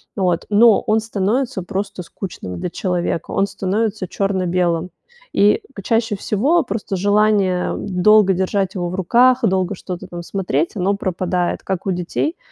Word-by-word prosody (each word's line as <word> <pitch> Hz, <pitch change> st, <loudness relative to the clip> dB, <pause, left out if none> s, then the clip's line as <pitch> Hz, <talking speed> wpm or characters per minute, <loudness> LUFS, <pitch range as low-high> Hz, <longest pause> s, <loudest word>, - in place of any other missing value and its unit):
вот, 180 Hz, -4 st, 0 dB
но 220 Hz, +1 st, +5 dB
он 215 Hz, +1 st, +3 dB
становится 220 Hz, +1 st, -1 dB
просто 195 Hz, 0 st, -4 dB
скучным 165 Hz, -, -7 dB
для -, -, -3 dB
человека, 175 Hz, -2 st, -2 dB
он 195 Hz, -, +1 dB
становится 200 Hz, +1 st, -2 dB
чёрно-белым, 180 Hz, -3 st, 0 dB, 0.4 s
и 205 Hz, +1 st, +4 dB, 0.2 s
чаще 225 Hz, +1 st, +1 dB
всего 270 Hz, -, +1 dB
просто 205 Hz, -3 st, -4 dB
желание 200 Hz, -2 st, +2 dB
долго 200 Hz, +1 st, +4 dB
держать 190 Hz, +1 st, -1 dB
его 175 Hz, -2 st, -2 dB
в 180 Hz, -, -4 dB
руках, 245 Hz, +7 st, +4 dB
долго 190 Hz, +1 st, +1 dB
что-то 180 Hz, 0 st, -7 dB
там 175 Hz, -1 st, -7 dB
смотреть, 170 Hz, -4 st, -1 dB
оно 195 Hz, +1 st, +1 dB
пропадает 180 Hz, -2 st, -1 dB
как 190 Hz, -2 st, -3 dB
у -, -, +2 dB
детей, 180 Hz, -, -2 dB
195 Hz, 145 wpm, -19 LUFS, 180-210 Hz, 0.4 s, но